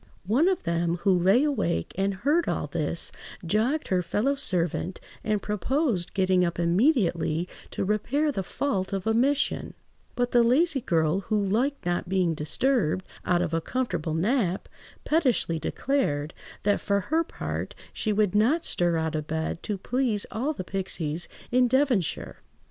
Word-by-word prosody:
One 250 - +3
of 375 -2 +1
them, 170 0 0
who 200 - +4
lay 190 +8 +4
awake 275 - 0
and 195 +1 0
heard 295 - +1
all - - -1
this, 155 +2 -2 0.3
jogged 225 - 0
her 185 -1 +2
fellow–servant, 185 - 0 0.2
and 210 -2 0
proposed 210 - -1
getting 185 -2 +3
up 170 -1 -1
immediately 175 - +2 0.2
to - - -3
repair 265 +9 +1
the 195 - -2
fault 195 -1 -2
of 195 -2 -2
omission; 255 +6 +1 0.4
but 245 0 0
the 240 - +5
lazy 270 +5 +3
girl, 160 -2 +1
who 215 +2 -1
liked 230 +8 0
not 175 0 -1
being 180 -3 +2
disturbed 185 - 0 0.2
out 175 -1 +3
of 170 -2 -3
a 165 - +1
comfortable 175 -10 -2
nap, 195 +1 0 0.4
pettishly 255 - +2
declared 155 - -1 0.3
"That, 205 0 +2
for 200 -1 +1
her 315 - +1
part, - - -5 0.2
she 215 - -1
would 205 -2 +2
not 245 +11 +3
stir 175 -1 +1
out 160 -1 -1
of 155 -1 -3
bed 160 +1 -2
to 210 - -3
please 230 0 0
all 260 +7 -1
the 275 - -5
pixies 175 -4 -3 0.2
in 250 0 +4
Devonshire." 255 - 0
200 Hz, 155 wpm, -26 LUFS, 175-255 Hz, 0.4 s, the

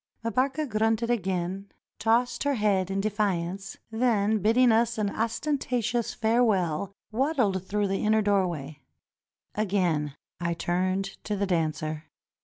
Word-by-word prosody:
Mbarka 265 +7 0
grunted 225 +1 +1
again, 190 -2 -2 0.3
tossed 235 +2 +2
her 285 -1 +1
head 200 -4 +1
in 195 0 0
defiance, 195 -3 -2
then 220 -2 +2
bidding 230 +5 +4
us 225 +1 +2
an 205 -2 0
ostentatious 240 -1 -1
farewell, 200 -7 +1 0.2
waddled 220 - 0
through 205 0 0
the 195 0 -1
inner 215 0 +3
doorway. 170 -8 0 0.7
Again 180 -9 0 0.2
I 170 -1 -1
turned 185 +3 -1
to 210 - -1
the 200 0 0
dancer. 155 -3 -1
205 Hz, 120 wpm, -27 LUFS, 185-230 Hz, 0.7 s, bidding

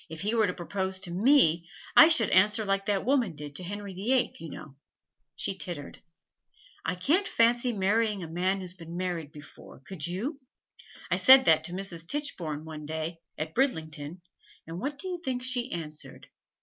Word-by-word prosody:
If 160 0 -8
he 210 +3 -1
were 220 -3 +3
to 180 - -2
propose 190 +1 -3
to 180 -3 -5
me, 180 - +4 0.3
I 315 - +10
should 280 - +4
answer 205 +3 +4
like 195 0 0
that 200 -2 0
woman 250 - +2
did 145 -1 -8
to - - -6
Henry 200 +1 -6
the 200 +8 0
Eighth, 250 -9 0
you 165 - -7
know.' 150 -2 -10 0.6
She 195 - -2
tittered. 175 -7 -7 0.8
'I 180 - -1
can't 315 - +2
fancy 240 +2 +3
marrying 210 -1 +1
a - - -6
man 185 +4 0
who's 180 -1 -7
been 170 -2 -9
married 175 -5 -3
before, 150 -3 -13
could 175 -5 -4
you? 235 - -3 0.7
I - - +3
said 265 0 +8
that 160 -1 +4
to 175 - -5
Mrs. 180 -3 -5
Tichborne 170 - -3
one 155 -2 -8
day, 160 +2 -4 0.2
at 155 +1 -4
Bridlington, 160 - -2 0.4
and 165 +2 -6
what 280 +5 -3
do 375 - -6
you 355 -2 -4
think 250 -1 -2
she 255 0 -2
answered? 155 -3 -7
190 Hz, 185 wpm, -28 LUFS, 165-235 Hz, 0.8 s, I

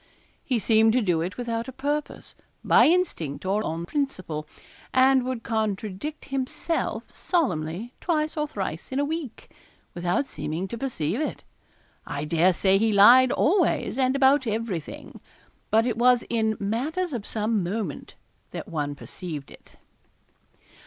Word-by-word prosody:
He 255 - 0
seemed 220 +1 +4
to 255 - +3
do 175 -5 +1
it 180 +4 -4
without 235 -1 -3
a - - -5
purpose 290 +3 -3 0.3
by - - +6
instinct, 300 - 0
or 200 +3 +1
on 165 -1 -3
principle 185 - -3 0.5
and 260 0 +5
would 250 -2 -4
contradict 220 +6 -3
himself 270 +5 -2
solemnly 215 - -1
twice 310 -3 0
or 300 -1 -1
thrice 190 - -5
in 260 - -1
a 285 - +2
week, 305 -5 -5 0.4
without 175 +9 0
seeming 175 - -4
to 235 - -5
perceive 230 - -2
it. 310 - -3 0.6
I 145 +1 -3
dare 170 +4 +3
say 190 +2 +3
he 225 +1 +2
lied 240 +6 +7
always, 330 - +1
and 260 0 +2
about 270 -1 +4
everything. 215 -8 -4 0.5
But 225 +2 +3
it 235 -3 -1
was 250 0 +5
in 220 -2 +1
matters 285 - -2
of 225 -5 -4
some 215 -1 0
moment 185 -4 -4 0.3
that - - -7
one 145 -3 -3
perceived 150 -2 -7
it. - - -17
225 Hz, 145 wpm, -25 LUFS, 185-270 Hz, 0.6 s, lied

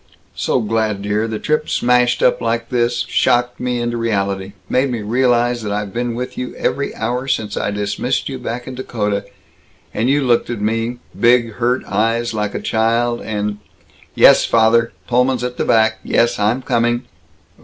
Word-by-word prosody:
So 125 - 0
glad, 110 -2 -1
dear, 105 +2 0
the 110 -1 -3
trip 155 +5 -1
smashed 125 0 +2
up 125 - +3
like 115 0 -1
this 120 -1 0
shocked 120 -1 +1
me 125 -1 -1
into 120 0 -2
reality 100 -4 -1
made 130 +2 +1
me 120 -4 -3
realize 120 +1 +1
I've 105 -1 -3
been 120 0 -2
with 125 +1 -5
you 125 - -5
every 140 - -2
hour 125 +2 -2
since 105 -5 -1
I - - -1
dismissed 105 +5 -2
you, 135 -2 -5
back 125 0 -5
in 130 - -7
Dakota, 105 -5 -2 0.7
and 115 +4 0
you 145 +1 +2
looked 120 -2 +2
at 120 -3 -3
me, 115 +3 -1 0.2
big 120 -1 +4
hurt 125 +3 0
eyes, 115 +3 0
like 105 -1 -2
a - - -1
child, 115 +2 +1
and 105 -1 -3 0.6
Yes, - - +7
father, 115 +1 +3
Pullman's 125 0 +1
at 125 0 -4
the - - -1
back. 110 -1 +3
Yes, 120 -1 +1
I'm 110 +5 +1
coming!" 120 0 +1
120 Hz, 170 wpm, -18 LUFS, 110-125 Hz, 0.7 s, Yes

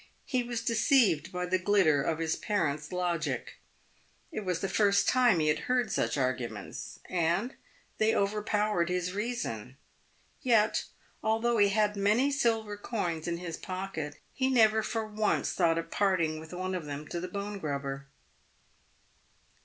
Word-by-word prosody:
He 255 - 0
was 240 -1 -3
deceived 220 - +3
by 180 0 -2
the 185 +1 +1
glitter 185 -7 +3
of 155 +3 0
his 160 0 0
parent's 155 -8 -1
logic. 175 -3 -2 0.7
It 315 - -3
was 185 -5 -2
the 195 - -1
first 200 +1 +3
time 245 -7 +4
he 155 - +1
had 150 - +2
heard 245 -4 +2
such - - 0
arguments, 130 -3 -3
and 180 +8 0 0.5
they 220 +1 +3
overpowered 210 -2 +1
his 180 0 -1
reason. 200 - -4 0.7
Vet, 225 -4 +3 0.4
although 225 +1 +1
he 205 -1 +5
had 210 0 +2
many 215 +8 +3
silver 225 -6 0
coins 175 -7 -3
in 170 0 -1
his 170 -2 -5
pocket, 185 -6 -5 0.2
he 265 0 +1
never 220 -4 +5
for 220 0 -2
once 215 0 0
thought 165 -3 +2
of 165 0 -4
parting 175 -6 +1
with 160 0 -11
one 185 +1 -3
of 180 -4 -3
them 145 +1 -6
to 175 - -3
the 180 - -4
bone 200 +2 -5
grubber. 140 -3 -4
195 Hz, 155 wpm, -30 LUFS, 165-215 Hz, 0.7 s, he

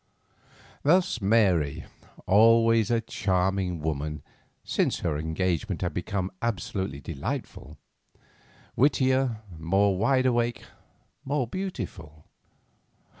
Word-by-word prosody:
Thus 165 -5 +2
Mary, 95 -8 +2 0.4
always 115 +1 +5
a 115 -1 +2
charming 95 -4 -1
woman, 75 -1 -3 0.4
since - - 0
her - - -1
engagement 85 +5 -2
had 90 - -2
become 95 +1 -3
absolutely 95 -9 -3
delightful; 85 - -6 1.0
wittier, 130 -4 +2 0.2
more 95 +4 +2
wideawake, 120 0 +1 0.6
more 140 -1 -1
beautiful. 95 - -6
100 Hz, 80 wpm, -27 LUFS, 85-120 Hz, 1.0 s, always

